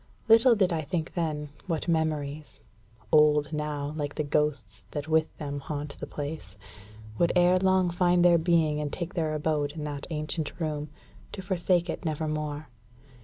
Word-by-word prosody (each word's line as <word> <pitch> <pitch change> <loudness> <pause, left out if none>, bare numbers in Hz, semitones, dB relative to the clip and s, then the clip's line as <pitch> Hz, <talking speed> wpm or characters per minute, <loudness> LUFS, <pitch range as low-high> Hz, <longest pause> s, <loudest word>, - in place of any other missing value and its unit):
Little 230 +2 +7
did 190 -4 +2
I 160 - 0
think 160 +1 -3
then 155 -4 -2 0.2
what 165 -2 -2
memories 155 -3 -2 0.5
old, 150 0 +4
now, 150 -1 -3
like 145 -2 -3
the 155 - -1
ghosts 140 -8 -1
that 145 0 -5
with 160 0 +1
them 145 -2 -4
haunt 145 0 -5
the - - -5
place 145 -9 -6 0.6
would 170 - +3
ere 180 +1 +5
long 185 -1 +3
find 175 0 +3
their 170 -1 +6
being 160 -3 +2
and 145 -1 -3
take 175 0 -4
their 160 -3 -1
abode 150 -1 -1
in 155 -2 -6
that 145 -2 -5
ancient 155 +1 -3
room, 150 -2 -3 0.4
to 190 - -6
forsake 180 -1 +1
it - - -4
never 155 -1 -2
more. 150 -1 -4
155 Hz, 170 wpm, -28 LUFS, 150-170 Hz, 0.6 s, Little